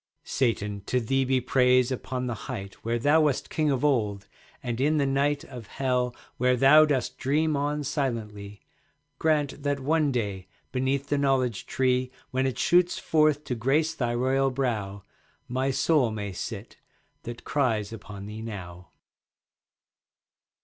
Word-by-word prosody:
PRAYER - - -26
Satan, 105 -5 -1
to 125 - +1
thee 135 +3 +1
be 130 0 +2
praise 125 0 +3
upon 130 0 -3
the 120 - -2 0.2
Height 100 -6 -5
Where 115 +1 0
thou 145 +6 +4
wast 150 -4 0
king 155 -1 +1
of 135 0 +1
old, 105 -8 0 0.4
and 120 0 -3
in 150 +3 +3
the 140 - +2
night 140 +2 +1
Of 125 -8 -10
Hell, 125 -1 -1 0.2
where 125 +1 +3
thou 145 +5 +7
dost 145 -4 -1
dream 150 +3 +1
on 145 +1 -1
silently. 110 -8 -3 0.6
Grant 150 -3 +1
that 145 0 -1
one 150 +1 +1
day 100 -7 -3 0.2
beneath 135 +2 -1
the 145 - +1
Knowledge 130 -4 0
tree, 130 -1 +1 0.2
When 130 +1 +1
it 130 - -3
shoots 175 0 +3
forth 155 -2 +2
to 135 - -3
grace 135 +7 +1
thy 120 -3 -1
royal 135 +2 +2
brow, 110 -7 -2 0.4
My 130 +2 -1
soul 135 -1 +2
may 105 -2 -4
sit, 105 +4 -7 0.4
that 120 0 -8
cries 115 -7 0
upon 100 -2 -9
thee 105 +1 -7
now. 90 -5 -8
130 Hz, 155 wpm, -27 LUFS, 115-140 Hz, 0.6 s, thou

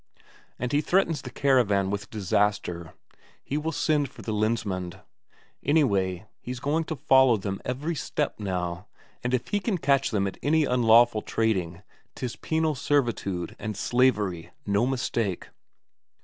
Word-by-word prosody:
And 125 0 -3
he 145 +1 +3
threatens 165 -3 +1
the 130 - -7
caravan 110 -9 +2
with 100 0 -4
disaster 95 -4 -1 0.5
he 140 - -4
will 155 +2 -1
send 150 -3 +1
for - - -13
the 110 - -3
Lensmand; 105 -5 -1 0.6
anyway, 100 - +1
he's 125 0 -6
going 155 +5 0
to 160 - -4
follow 130 -3 +5
them 100 -1 -4
every 140 +7 -2
step 150 -3 -2
now, 90 -3 -3 0.4
and 125 - -1
if 125 -2 -1
he 205 - +1
can 200 -1 -1
catch 140 -3 +2
them 100 -3 0
at 95 - -5
any 155 +1 +3
unlawful 120 -2 +4
trading 95 -7 -1 0.3
'tis 125 -1 -4
penal 160 -1 0
servitude 120 - -1
and 105 0 -4
slavery, 105 -9 +1 0.2
no 100 +4 +2
mistake! 115 -7 -2
120 Hz, 145 wpm, -26 LUFS, 100-140 Hz, 0.6 s, follow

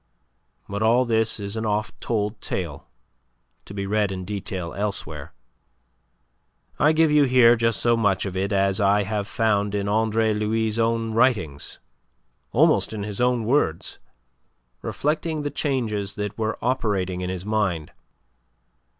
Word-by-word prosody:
But 100 +1 -4
all 120 +3 +4
this 110 -1 +1
is 100 +1 -2
an 110 - -2
oft 105 0 -2
told 105 -2 -2
tale, 85 -6 -4 0.8
to - - -10
be 100 -1 -3
read 105 0 +1
in 95 -1 -5
detail 95 -4 -4
elsewhere. 100 +2 -4 1.5
I 150 +1 +5
give 160 -1 +3
you 150 -1 +5
here 125 -2 +6
just 115 -2 +1
so 120 0 +3
much 100 -4 +1
of 95 -1 -5
it 95 +2 -1
as 100 0 +2
I 100 +1 +3
have 100 0 -3
found 105 -3 0
in 100 0 -1
Andre 110 +1 +2
Louis' 110 +1 0
own 115 0 0
writings, 110 - +1 0.7
almost - - +3
in 105 -2 -4
his 105 +1 -4
own 125 -2 +2
words, 115 - 0 0.8
reflecting 155 +1 -2
the 145 - -2
changes 110 -9 -2
that 105 0 -4
were 110 0 -2
operated 100 -7 0
in 90 - -3
his 95 0 -4
mind. 100 -8 -1
105 Hz, 145 wpm, -24 LUFS, 100-115 Hz, 1.5 s, here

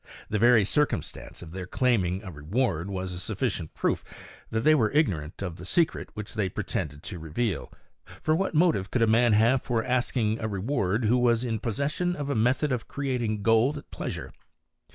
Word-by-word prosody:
The 105 - 0
very 115 -2 +6
circumstance 150 -4 -1
of 80 - -10
their 90 0 -6
claiming 95 -6 +1
a 95 - -7
reward 85 - -1
was 95 -1 -3
a 90 - -5
sufficient 100 - -2
proof - - 0 0.5
that 110 - -1
they 155 +6 +5
were 115 -8 +3
ignorant 95 - 0
of 90 -4 -4
the 85 - -10
secret 165 - +1
which 105 0 -6
they 105 -5 0
pretended 75 -3 -4
to 90 - -6
reveal; 80 - -2 0.5
for 155 - +2
what 190 -1 -1
motive 155 - +3
could 120 - +1
a - - +6
man 115 +1 +4
have 115 +5 +4
for 115 -2 -1
ask 125 +1 0
ing 110 -1 +1
a 110 - -2
reward 105 +1 0
who 120 +4 +3
was 120 -1 +3
in 115 -3 -1
possession 145 - -1
of 145 -2 -3
a - - 0
method 125 +6 +2
of 125 -3 -2
creating 120 -7 -2
gold 115 +6 +3
at 145 - -11
pleasure? - - -5
115 Hz, 195 wpm, -27 LUFS, 95-130 Hz, 0.5 s, very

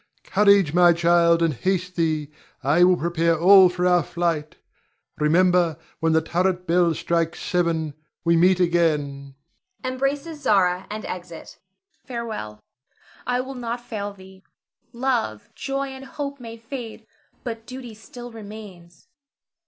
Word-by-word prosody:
Courage, 200 -5 +4
my 175 0 +6
child, 170 0 +3
and 165 -2 +2
haste 180 +6 -2
thee. 155 -3 -1 0.3
I 150 +6 +4
will 180 0 +5
prepare 170 0 +1
all 190 +1 +8
for 180 0 -2
our 180 -1 +4
flight. 165 -1 -2 0.6
Remember, 170 +1 +3 0.2
when 165 +1 +1
the 160 0 +3
turret 180 +2 0
bell 170 -1 +2
strikes 165 0 -1
seven, 165 -4 -1 0.3
we 170 0 +4
meet 180 +2 +4
again. 150 -6 0 0.5
[Embraces 275 +4 -2
Zara, 185 -5 +2
and 215 +1 -6
exit. 180 -1 -7
Zara. 385 +1 -24
Farewell! 220 - -5 0.7
I 250 0 +1
will 265 +1 -7
not 240 -1 -4
fail 215 -4 -5
thee. 190 -1 -15 0.5
Love, 235 - -2
joy, 275 0 -3
and 265 0 -9
hope 280 0 -6
may 230 -1 -9
fade, 230 -1 -8 0.4
but 225 -2 -6
duty 255 -2 -8
still 240 +3 -11
remains. 205 - -12
180 Hz, 135 wpm, -23 LUFS, 170-230 Hz, 0.7 s, all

